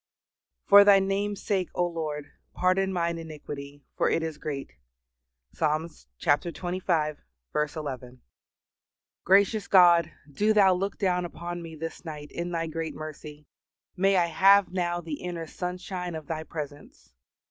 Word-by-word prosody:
"For 200 Hz, 0 st, +9 dB
Thy 200 Hz, -1 st, +7 dB
name's 195 Hz, +1 st, -1 dB
sake, 190 Hz, -4 st, 0 dB
O 175 Hz, -, +2 dB
Lord, 155 Hz, -4 st, -4 dB, 0.2 s
pardon 190 Hz, +1 st, +2 dB
mine 170 Hz, -2 st, -1 dB
iniquity; 145 Hz, -3 st, -8 dB
for -, -, +2 dB
it 165 Hz, -, +1 dB
is 160 Hz, -2 st, -5 dB
great." 140 Hz, -, -5 dB, 0.8 s
Ps. -, -, -23 dB
xxv. 155 Hz, -, -2 dB
11. 130 Hz, -5 st, -6 dB, 1.0 s
Gracious 200 Hz, +2 st, +3 dB
God! 175 Hz, -3 st, +6 dB, 0.2 s
do 210 Hz, +9 st, +2 dB
Thou 195 Hz, -3 st, +6 dB
look 195 Hz, +2 st, -2 dB
down 180 Hz, -3 st, +1 dB
upon 175 Hz, 0 st, -6 dB
me 165 Hz, -1 st, -9 dB
this 165 Hz, +1 st, -7 dB
night 150 Hz, -3 st, -8 dB
in 170 Hz, +1 st, -4 dB
Thy 165 Hz, -1 st, -2 dB
great 165 Hz, 0 st, -4 dB
mercy. 150 Hz, -1 st, -9 dB, 0.5 s
May 195 Hz, +1 st, +3 dB
I 175 Hz, -, +4 dB
have 195 Hz, +4 st, +5 dB
now 175 Hz, -1 st, -1 dB
the 160 Hz, -3 st, -6 dB
inner 175 Hz, -2 st, -4 dB
sunshine 180 Hz, +1 st, -5 dB
of 155 Hz, -1 st, -7 dB
Thy 160 Hz, +1 st, -4 dB
presence! 145 Hz, -, -9 dB
170 Hz, 135 wpm, -27 LUFS, 150-185 Hz, 1.0 s, For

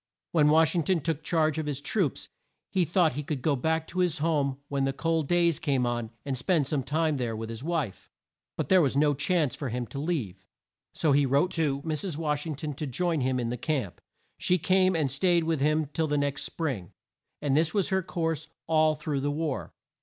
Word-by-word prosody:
When 150 Hz, -3 st, +4 dB
Wash 160 Hz, 0 st, +4 dB
ing 175 Hz, -, +2 dB
ton 170 Hz, +1 st, +1 dB
took 160 Hz, 0 st, -2 dB
charge 155 Hz, -2 st, +1 dB
of 155 Hz, -, -3 dB
the 145 Hz, -, -1 dB
troops, 145 Hz, -, -1 dB, 0.4 s
he 185 Hz, -2 st, +2 dB
thought 165 Hz, 0 st, +3 dB
that 125 Hz, -, -9 dB
he -, -, -1 dB
could 140 Hz, -3 st, -4 dB
go 150 Hz, -3 st, +2 dB
back 160 Hz, +4 st, 0 dB
to 185 Hz, -, -4 dB
his 180 Hz, -3 st, +2 dB
home 145 Hz, -4 st, 0 dB
when 140 Hz, -1 st, -1 dB
the 135 Hz, 0 st, 0 dB
cold 165 Hz, -1 st, 0 dB
days 170 Hz, -1 st, +3 dB
came 135 Hz, -4 st, +1 dB
on, 120 Hz, -2 st, -2 dB, 0.2 s
and 140 Hz, -2 st, -1 dB
spend 150 Hz, +3 st, +1 dB
some 145 Hz, 0 st, 0 dB
time 155 Hz, +2 st, 0 dB
there 120 Hz, -3 st, -2 dB
with 110 Hz, 0 st, -5 dB
his 115 Hz, +2 st, -7 dB
wife. 155 Hz, -, -3 dB, 0.5 s
But -, -, -2 dB
there 185 Hz, -1 st, +6 dB
was 140 Hz, -3 st, +1 dB
no 145 Hz, 0 st, +4 dB
chance 145 Hz, -1 st, +1 dB
for 140 Hz, -, -4 dB
him 120 Hz, +1 st, -3 dB
to 140 Hz, -, -7 dB
leave, 145 Hz, -, -3 dB, 0.5 s
so 155 Hz, -, +1 dB
he 140 Hz, 0 st, +4 dB
wrote 140 Hz, +7 st, +2 dB
to 145 Hz, -4 st, 0 dB
Mrs. 160 Hz, +1 st, -3 dB
Wash 150 Hz, -1 st, -1 dB
ing 155 Hz, -, -3 dB
ton 150 Hz, +1 st, -4 dB
to 150 Hz, +2 st, -4 dB
join 165 Hz, +4 st, 0 dB
him 130 Hz, 0 st, +1 dB
in 120 Hz, -1 st, -1 dB
the 125 Hz, -, -3 dB
camp. 130 Hz, -, -2 dB, 0.4 s
She 180 Hz, -, +3 dB
came 185 Hz, +2 st, +3 dB
and 150 Hz, -5 st, +1 dB
staid 170 Hz, +4 st, +2 dB
with 160 Hz, -3 st, 0 dB
him 155 Hz, +2 st, +2 dB
till 160 Hz, 0 st, 0 dB
the 150 Hz, 0 st, 0 dB
next 145 Hz, 0 st, -1 dB
spring; 130 Hz, -, -4 dB, 0.5 s
and 140 Hz, -2 st, 0 dB
this 160 Hz, +1 st, +3 dB
was 200 Hz, -, +2 dB
her 190 Hz, -1 st, +2 dB
course 165 Hz, -3 st, -2 dB, 0.2 s
all 155 Hz, -1 st, +3 dB
through 150 Hz, -2 st, -2 dB
the 145 Hz, +2 st, -1 dB
war. 150 Hz, -1 st, -2 dB
150 Hz, 225 wpm, -28 LUFS, 140-165 Hz, 0.5 s, there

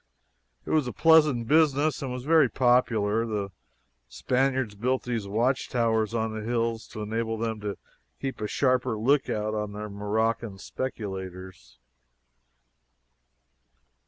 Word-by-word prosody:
It -, -, -5 dB
was 155 Hz, -5 st, +2 dB
a 125 Hz, -, -4 dB
pleasant 150 Hz, -8 st, +4 dB
business, 150 Hz, -1 st, +3 dB
and 135 Hz, -2 st, -4 dB
was 125 Hz, 0 st, -5 dB
very 155 Hz, -2 st, +4 dB
popular. 115 Hz, -4 st, +2 dB
The 100 Hz, -3 st, -3 dB, 0.6 s
Spaniards 130 Hz, -, 0 dB
built 125 Hz, +5 st, -1 dB
these 115 Hz, -5 st, -3 dB
watchtowers 115 Hz, 0 st, 0 dB
on 110 Hz, -1 st, -1 dB
the 110 Hz, -, -4 dB
hills 115 Hz, 0 st, -1 dB
to 105 Hz, -, -7 dB
enable 115 Hz, +1 st, -2 dB
them 110 Hz, -1 st, -3 dB
to 105 Hz, -1 st, -4 dB, 0.4 s
keep 135 Hz, -4 st, -4 dB
a 105 Hz, -, -1 dB
sharper 125 Hz, -2 st, +1 dB
lookout 110 Hz, -3 st, +1 dB
on 105 Hz, -1 st, -3 dB
the 105 Hz, +1 st, -6 dB
Moroccan 110 Hz, +1 st, -1 dB
speculators. 95 Hz, -, -6 dB
115 Hz, 125 wpm, -27 LUFS, 105-130 Hz, 0.6 s, pleasant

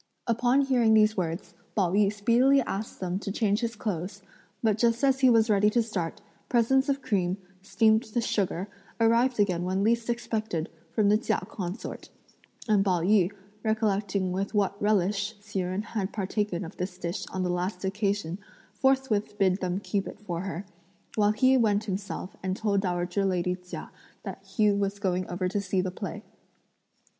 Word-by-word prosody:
Upon 245 Hz, +3 st, +3 dB
hearing 245 Hz, -5 st, +3 dB
these 215 Hz, 0 st, +5 dB
words, 170 Hz, 0 st, -3 dB, 0.2 s
Pao 185 Hz, -5 st, +2 dB
yü 200 Hz, +1 st, +3 dB
speedily 240 Hz, +6 st, +4 dB
asked 215 Hz, -3 st, -4 dB
them 185 Hz, 0 st, -2 dB
to 200 Hz, -, -4 dB
change 210 Hz, 0 st, +1 dB
his 235 Hz, -1 st, -2 dB
clothes; 195 Hz, -1 st, -4 dB, 0.4 s
but 215 Hz, -1 st, +2 dB
just 235 Hz, +2 st, +2 dB
as 270 Hz, -1 st, +4 dB
he 260 Hz, -1 st, +6 dB
was 225 Hz, -2 st, +5 dB
ready 210 Hz, -1 st, +4 dB
to 235 Hz, +2 st, +2 dB
start, 185 Hz, -7 st, -4 dB, 0.3 s
presents 265 Hz, +3 st, +3 dB
of 275 Hz, 0 st, 0 dB
cream, 185 Hz, -2 st, 0 dB, 0.2 s
steamed 220 Hz, +3 st, +2 dB
with 235 Hz, -1 st, +1 dB
sugar, 190 Hz, -2 st, -1 dB, 0.3 s
arrived 230 Hz, +2 st, +3 dB
again 185 Hz, -4 st, +2 dB
when 190 Hz, +2 st, 0 dB
least 230 Hz, +2 st, +1 dB
expected 220 Hz, -8 st, -2 dB, 0.2 s
from 210 Hz, -2 st, +2 dB
the 210 Hz, +1 st, +4 dB
Chia -, -, 0 dB
Consort, 185 Hz, +2 st, -6 dB, 0.6 s
and 210 Hz, -3 st, +4 dB
Pao 180 Hz, -4 st, +1 dB
yü 190 Hz, 0 st, +3 dB, 0.3 s
recollecting 205 Hz, -3 st, 0 dB
with 195 Hz, +3 st, -2 dB
what 200 Hz, -1 st, +2 dB
relish 205 Hz, +1 st, +1 dB
Hsi 205 Hz, -1 st, -5 dB
Jen 185 Hz, +3 st, -2 dB
had 210 Hz, -3 st, -3 dB
partaken 200 Hz, -2 st, -2 dB
of 165 Hz, -, -10 dB
this 180 Hz, 0 st, -4 dB
dish 175 Hz, +1 st, -4 dB
on 185 Hz, 0 st, -3 dB
the 180 Hz, -, 0 dB
last 180 Hz, +2 st, -2 dB
occasion 200 Hz, -2 st, -1 dB, 0.3 s
forthwith 260 Hz, -4 st, +1 dB
bid 190 Hz, -2 st, +3 dB
them 185 Hz, 0 st, -1 dB
keep 200 Hz, -1 st, -2 dB
it -, -, -9 dB
for 175 Hz, -5 st, -4 dB
her; 195 Hz, 0 st, -5 dB, 0.5 s
while 210 Hz, -1 st, +3 dB
he 255 Hz, +4 st, +4 dB
went 210 Hz, -3 st, +2 dB
himself 195 Hz, -2 st, -5 dB
and 190 Hz, 0 st, -2 dB
told 205 Hz, -3 st, +1 dB
dowager 180 Hz, +1 st, -1 dB
lady 180 Hz, -1 st, +1 dB
Chia 180 Hz, 0 st, -9 dB, 0.3 s
that -, -, -7 dB
he 210 Hz, -3 st, +2 dB
was 200 Hz, 0 st, 0 dB
going 185 Hz, -2 st, -1 dB
over 180 Hz, +1 st, -1 dB
to 200 Hz, +2 st, -1 dB
see 190 Hz, -1 st, -1 dB
the 185 Hz, 0 st, -1 dB
play. 205 Hz, +2 st, -6 dB
205 Hz, 175 wpm, -28 LUFS, 185-220 Hz, 0.6 s, he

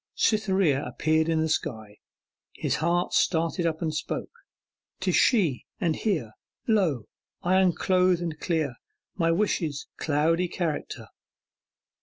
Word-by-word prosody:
Cytherea 190 Hz, -9 st, +2 dB
appeared 160 Hz, +1 st, +1 dB
in 160 Hz, -1 st, +2 dB
the 160 Hz, -, +1 dB
sky: 110 Hz, -8 st, -3 dB, 0.6 s
his -, -, -1 dB
heart 170 Hz, +2 st, 0 dB
started 165 Hz, +1 st, +1 dB
up 160 Hz, +1 st, -2 dB
and 160 Hz, -1 st, -1 dB
spoke: 155 Hz, -, -4 dB, 0.7 s
'Tis -, -, 0 dB
She, 175 Hz, -, +3 dB
and 165 Hz, -3 st, +1 dB
here 160 Hz, -, -1 dB, 0.4 s
Lo! 175 Hz, -, +2 dB, 0.4 s
I 185 Hz, +1 st, +4 dB
unclothe 185 Hz, 0 st, +3 dB
and 165 Hz, -3 st, -4 dB
clear 155 Hz, -8 st, -1 dB, 0.4 s
My 165 Hz, -3 st, +1 dB
wishes' 165 Hz, -5 st, 0 dB
cloudy 160 Hz, +4 st, +1 dB
character. 170 Hz, -3 st, -4 dB
165 Hz, 120 wpm, -26 LUFS, 155-180 Hz, 0.7 s, I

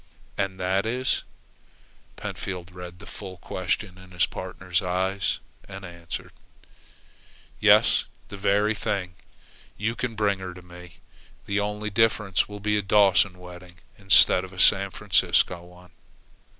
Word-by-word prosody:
"And 95 Hz, -1 st, -2 dB
that 95 Hz, +3 st, +1 dB
is 125 Hz, +2 st, 0 dB, 0.5 s
?" -, -, -32 dB
Pentfield 90 Hz, -2 st, -6 dB
read 90 Hz, -1 st, -9 dB
the -, -, -13 dB
full 95 Hz, -3 st, -9 dB
question 95 Hz, +1 st, -3 dB
in 95 Hz, 0 st, -14 dB
his 90 Hz, -1 st, +2 dB
partner's 90 Hz, 0 st, -3 dB
eyes, 95 Hz, -3 st, 0 dB, 0.3 s
and 95 Hz, 0 st, -8 dB
answered: 85 Hz, -1 st, -7 dB, 1.3 s
"Yes, -, -, +5 dB, 0.2 s
that 100 Hz, -, -8 dB
very 105 Hz, +2 st, +2 dB
thing. 95 Hz, -4 st, -2 dB, 0.6 s
You 110 Hz, +4 st, -1 dB
can 120 Hz, -3 st, -3 dB
bring 100 Hz, -2 st, +1 dB
her 95 Hz, -1 st, -5 dB
in 90 Hz, -, -9 dB
to 90 Hz, -, -11 dB
me. 90 Hz, 0 st, -14 dB, 0.4 s
The 100 Hz, 0 st, 0 dB
only 105 Hz, +1 st, -2 dB
difference 105 Hz, -3 st, +2 dB
will 105 Hz, 0 st, -7 dB
be 105 Hz, +1 st, +1 dB
a -, -, 0 dB
Dawson 100 Hz, -1 st, +4 dB
wedding 90 Hz, 0 st, -12 dB, 0.2 s
instead 95 Hz, -2 st, +5 dB
of 95 Hz, -, -9 dB
a 95 Hz, -, -9 dB
San 100 Hz, +1 st, +5 dB
Franciscan 90 Hz, -2 st, +2 dB
one." 90 Hz, 0 st, -16 dB
95 Hz, 145 wpm, -26 LUFS, 90-105 Hz, 1.3 s, Yes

